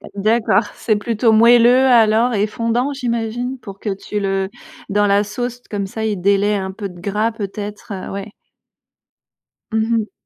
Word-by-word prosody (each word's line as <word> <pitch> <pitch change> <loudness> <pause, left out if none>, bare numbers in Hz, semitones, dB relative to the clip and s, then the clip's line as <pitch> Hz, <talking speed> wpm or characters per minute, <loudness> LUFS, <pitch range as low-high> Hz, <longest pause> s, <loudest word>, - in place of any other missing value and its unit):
D'accord, 215 +3 +2
c'est 215 - 0
plutôt 225 +2 +1
moelleux 240 +3 +6
alors, 235 -1 +4
et 210 0 +1
fondant, 230 +5 -1
j'imagine, 245 -1 -3
pour 195 -5 -10
que 215 - -4
tu 205 +2 -5
le 195 -1 -1 0.4
dans 205 +1 +2
la 200 0 +3
sauce, 245 +4 -5
comme 200 -2 -2
ça, 220 +3 -5
il 210 -3 -1
délais 200 +2 +2
un 190 -1 -3
peu 200 +1 -6
de 175 -1 -13
gras 210 +4 -1
peut-être, 210 -1 -7
heu, 185 - -6
ouais. 200 +1 -6 1.4
Mmh 220 +1 +1
mh. 220 -1 -3
215 Hz, 165 wpm, -19 LUFS, 200-235 Hz, 1.4 s, moelleux